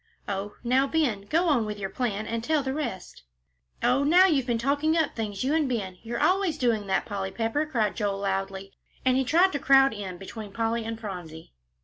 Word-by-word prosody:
Oh, 200 +1 -4
now, 260 +3 +2
Ben, 245 -11 0
go 335 +3 +2
on 280 -8 +3
with 210 -1 -4
your 195 -1 -4
plan 220 -4 -2
and 230 0 -3
tell 305 +1 +1
the 265 0 -2
rest." 235 - -5 0.6
"Oh, 250 +3 +3
now 350 +6 +6
you've 285 -8 +2
been 240 -2 +1
talking 285 +6 +1
up 320 -3 0
things, 210 -2 -3
you 270 +3 +1
and 310 -4 +1
Ben; 195 -7 -3
you're 235 +1 -4
always 370 -4 +2
doing 230 -6 0
that, 190 - 0
Polly 195 -2 -3
Pepper," 230 +9 -1
cried 220 -8 0
Joel, 205 -3 -1
loudly. 195 0 -3 0.3
And 255 0 +4
he 265 - +2
tried 345 +8 +4
to 285 - -2
crowd 270 -1 +5
in 195 -4 -6
between 205 +2 -9
Polly 230 0 -1
and 225 0 -5
Phronsie. 175 - -8
230 Hz, 210 wpm, -26 LUFS, 200-280 Hz, 0.6 s, now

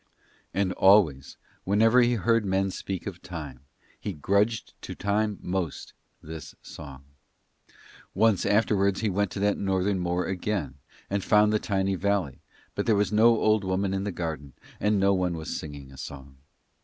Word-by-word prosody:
And 95 0 0
always, 90 -9 +3 0.3
whenever 110 +5 +4
he 120 0 +3
heard 115 +1 +2
men 95 0 0
speak 95 -1 -5
of 95 -3 -6
Time, 75 -7 -7 0.4
he 100 - -4
grudged 100 +8 0
to - - -7
Time 105 0 0
most 90 -4 -3 0.3
this 80 -1 -9
song. 70 -3 -10 1.1
Once 110 -5 +3
afterwards 100 -1 +2
he 110 -2 0
went 100 +1 0
to 100 - -6
that 100 0 +1
Northern 95 0 0
moor 90 0 -1
again 95 -6 -2 0.3
and 100 -1 -2
found 105 0 +4
the 105 - +2
tiny 95 -2 0
valley, 95 -6 -1 0.3
but - - -3
there 110 - +4
was 100 -1 +1
no 110 +2 +4
old 110 -1 +2
woman 95 +1 -1
in 95 0 -1
the 100 - -2
garden, 80 -6 -5 0.3
and 105 -1 +2
no 100 +1 +4
one 90 -2 0
was 80 +1 -5
singing 70 -3 -8
a 65 - -14
song. 70 -1 -9
95 Hz, 165 wpm, -27 LUFS, 85-105 Hz, 1.1 s, whenever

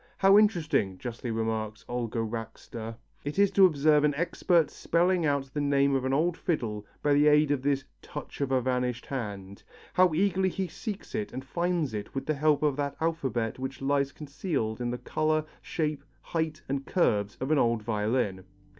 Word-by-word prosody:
"How 195 +2 +7
interesting," 160 - +2
justly 120 +2 -5
remarks 110 -1 -2
Olga 120 -2 -3
Racster, 115 0 -6 0.3
"it 145 +4 -4
is 200 -1 +4
to 195 -1 +7
observe 150 -2 +3
an 150 -1 +2
expert 170 +1 +2
spelling 175 0 +1
out 140 -2 -1
the 145 - -1
name 140 -1 +3
of 130 -1 +1
an 130 - 0
old 160 +5 +2
fiddle 110 - -2 0.2
by 145 - +4
the 145 +1 +5
aid 150 0 +5
of 140 -3 +1
this 140 0 +1 0.2
'touch - - -8
of 135 -1 0
a 130 -1 +3
vanished 125 -1 -1
hand.' 100 -7 -5 0.3
How 180 -3 +4
eagerly 190 +1 +2
he 190 +1 -2
seeks 205 +4 -7
it 210 -1 -2
and 130 +1 -6
finds 170 -2 -1
it 105 +3 -6
with 135 - -2
the 155 - +1
help 150 0 +2
of 145 -2 +2
that 140 -1 -2
alphabet 130 -9 -1
which 130 +1 -5
lies 140 0 +1
concealed 140 - -3
in 120 - -1
the 125 - -2
colour, 155 +3 0 0.2
shape, 150 -3 -2 0.2
height 160 -2 -2
and 135 0 -2
curves 105 - +1
of 130 +3 -2
an 155 - +4
old 115 -2 +2
violin." 105 -3 0
140 Hz, 185 wpm, -28 LUFS, 120-155 Hz, 0.3 s, How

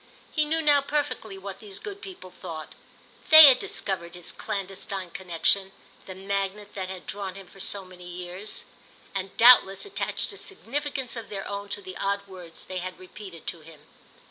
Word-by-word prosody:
He 305 -2 +2
knew 320 +2 0
now 290 -2 +6
perfectly 280 -8 -2
what 195 0 -7
these 205 -3 -7
good 405 -1 -7
people 370 - -10
thought; 165 -4 -8 0.6
they 315 0 +13
had 260 -3 +8
discovered 175 -3 -3
his 175 -1 -4
clandestine 195 -2 -4
connexion, 190 +2 +1 0.3
the 185 - -7
magnet 200 +1 -3
that 190 -2 -4
had 190 -1 -7
drawn 195 -2 -5
him 195 -1 -9
for 195 - -17
so 195 0 0
many 180 -1 -12
years, 180 +3 -5 0.5
and 195 -1 -4
doubtless 230 - +7
attached 405 - -2
a - - -7
significance 285 - -3
of 230 -3 -7
their 195 -2 -5
own 200 0 -5
to 205 - -2
the 185 - -8
odd 200 0 -1
words 180 -3 -10
they 185 -1 -4
had 185 +1 -5
repeated 185 -2 -11
to 170 - -4
him. 155 -1 -14
195 Hz, 175 wpm, -27 LUFS, 185-225 Hz, 0.6 s, they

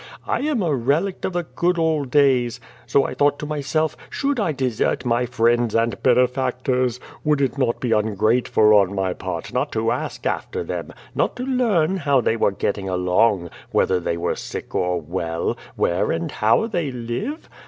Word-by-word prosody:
I - - 0
am 285 -7 0
a 160 -4 +1
relict 150 +10 0
of 190 - -2
the 175 0 -1
good 175 +2 0
old 160 -4 +1
days. 130 -4 +3 0.3
So 140 - +3
I - - -3
thought 145 0 +2
to - - -5
m3'self, 155 +1 -1
should 280 -2 -1
I 190 -7 +1
desert 130 -5 -1
my 120 +1 +1
friends 120 -1 +2
and 115 +1 0
bene 125 0 +5
factors? 125 -1 -1 0.2
Would 150 -1 +2
it 135 -3 0
not 120 -3 +1
be 125 - -2
ungrateful 110 +1 +3
on 100 -1 +4
my 95 -2 0
part - - -5
not - - 0
to 115 +1 +1
ask 125 - -4
after 450 0 -2
them, - - -5 0.2
not - - 0
to 250 - -4
learn 215 -10 +1
how 140 -5 +2
they 115 -1 +1
were 115 - +2
getting 100 0 -2
along, 90 0 +2 0.2
whether 90 -1 +2
tJiey 85 0 -2
were 85 - -1
sick - - -7
or 90 -1 0
well, 85 0 -2 0.2
where 85 +1 +1
and 165 -2 -2
how 115 - +2
they 175 -10 -2
live? 125 - -4
125 Hz, 185 wpm, -22 LUFS, 110-155 Hz, 0.3 s, bene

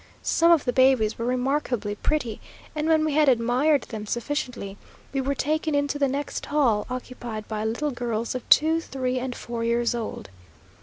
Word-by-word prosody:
Some 335 +1 +4
of 330 -4 +4
the 245 - 0
babies 255 -5 +3
were 230 - -2
remarkably 250 -4 -1
pretty, 235 0 -2 0.3
and 305 +1 -1
when 315 -1 +3
we 310 - 0
had 300 -1 +4
admired 255 +4 +3
them 215 -2 -7
sufficiently, 240 -5 -3 0.4
we 270 - 0
were 280 +1 -1
taken 310 +2 0
into 285 0 0
the 280 - +3
next 280 +2 -3
hall, 250 -8 +2
occupied 245 -3 -6
by 215 -1 -3
little 265 +7 -1
girls 235 -2 -2
of 255 -2 -6
two, 320 +2 +5
three, 255 -4 -2
and 250 -1 -4
four 235 -1 -5
years 235 +1 +1
old. 230 - -5
255 Hz, 175 wpm, -25 LUFS, 235-290 Hz, 0.4 s, two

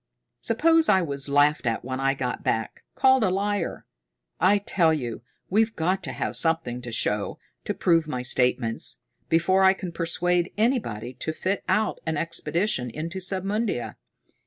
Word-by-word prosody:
Suppose 325 -1 +3
I 190 -3 +4
was 140 -3 -2
laughed 145 -1 +3
at 115 +1 -1
when 130 0 -3
I 135 0 +1
get 125 -2 -3
back, 110 -1 -2
called 260 -2 +4
a 190 - +3
liar! 200 +2 -2 0.5
I 195 +3 +5
tell 185 -4 +2
you, 125 -8 -3 0.3
we've 220 +3 +1
got 185 +4 0
to - - -4
have - - -3
something 160 -7 0
to 120 -1 -7
show, 105 -2 -1 0.3
to - - -2
prove 165 -3 +2
my 125 -4 -3
statements, 125 -2 0 0.3
before 175 +4 +3
I 190 0 +7
can 185 -2 -6
persuade 175 +1 0
anybody 210 - 0
to 160 - -2
fit 190 +5 -2
out 215 0 +1
an 160 -1 0
expedition 165 - -1
into 165 +9 -5
Submundia. 190 - -2
165 Hz, 160 wpm, -25 LUFS, 130-195 Hz, 0.5 s, I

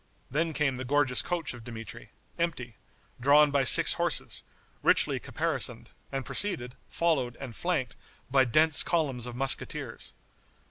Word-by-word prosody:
Then 160 +4 0
came 145 -4 0
the 130 - -4
gorgeous 135 -1 +2
coach 175 -5 -3
of 120 -2 -11
Dmitri, 115 -2 -9 0.3
empty, 125 -9 -2 0.4
drawn 145 +3 +5
by 140 -1 +2
six - - +5
horses, - - 0 0.4
richly - - +2
caparisoned, - - -1 0.2
and 135 -1 -3
preceded, 125 -12 -2 0.2
followed 140 -8 0
and 130 -4 -8
flanked 150 -9 -2 0.3
by 135 0 +3
dense 155 +5 +4
columns 140 -8 0
of 120 - -7
musqueteers. 135 +1 -3
135 Hz, 135 wpm, -28 LUFS, 125-155 Hz, 0.4 s, drawn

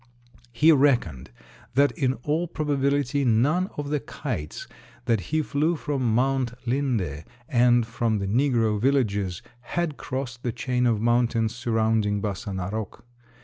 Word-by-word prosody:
He 150 +7 +5
reckoned 125 - +2 0.5
that 140 +1 +4
in 130 -2 0
all 160 +4 0
probability 145 -2 0
none 140 - +2
of 145 -1 -3
the 150 - +1
kites 75 - -5 0.4
that 115 -4 +2
he 155 0 +1
flew 155 +4 0
from 130 -7 -1
Mount 130 -1 +1
Linde 115 - -1 0.2
and 120 -1 +4
from 115 -1 -1
the 100 - -2
negro 115 -2 +1
villages 105 -9 0 0.2
had 155 +5 -3
crossed 130 -3 -5
the 120 - -2
chain 125 +1 0
of 115 -3 +2
mountains 115 -1 +1
surrounding 110 -3 +1
Bassa 100 +1 -4
Narok. 100 +3 -4
120 Hz, 135 wpm, -25 LUFS, 110-140 Hz, 0.5 s, He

